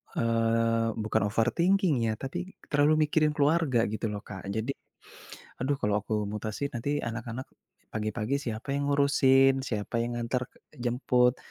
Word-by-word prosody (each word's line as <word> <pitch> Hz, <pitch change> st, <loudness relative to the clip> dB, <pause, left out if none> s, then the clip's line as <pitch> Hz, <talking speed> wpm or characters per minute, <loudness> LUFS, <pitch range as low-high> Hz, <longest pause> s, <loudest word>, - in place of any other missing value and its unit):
eee, 115 Hz, 0 st, +2 dB, 0.2 s
bukan 105 Hz, -1 st, +1 dB
overthinking 165 Hz, -, +2 dB
ya 110 Hz, -, +1 dB
tapi 175 Hz, +8 st, -5 dB, 0.2 s
terlalu 145 Hz, +1 st, +4 dB
mikirin 150 Hz, 0 st, +2 dB
keluarga 145 Hz, -5 st, +3 dB
gitu 110 Hz, +1 st, -3 dB
loh, 105 Hz, -1 st, -4 dB
Kak. 95 Hz, -1 st, -8 dB
Jadi, 115 Hz, +5 st, -1 dB, 0.9 s
aduh 140 Hz, +2 st, +1 dB
kalau 105 Hz, -4 st, 0 dB
aku 105 Hz, -, -4 dB
mutasi 110 Hz, +7 st, -4 dB
nanti 140 Hz, +5 st, -1 dB
anak-anak 120 Hz, +2 st, -5 dB, 0.5 s
pagi-pagi 110 Hz, +3 st, -1 dB
siapa 115 Hz, +1 st, -4 dB
yang 140 Hz, 0 st, -1 dB
ngurusin, 135 Hz, -1 st, +4 dB
siapa 115 Hz, -1 st, -2 dB
yang 120 Hz, 0 st, -3 dB
ngantar 125 Hz, +1 st, -2 dB
ke -, -, -25 dB, 0.2 s
jemput. 125 Hz, 0 st, +2 dB
120 Hz, 140 wpm, -28 LUFS, 115-140 Hz, 0.9 s, terlalu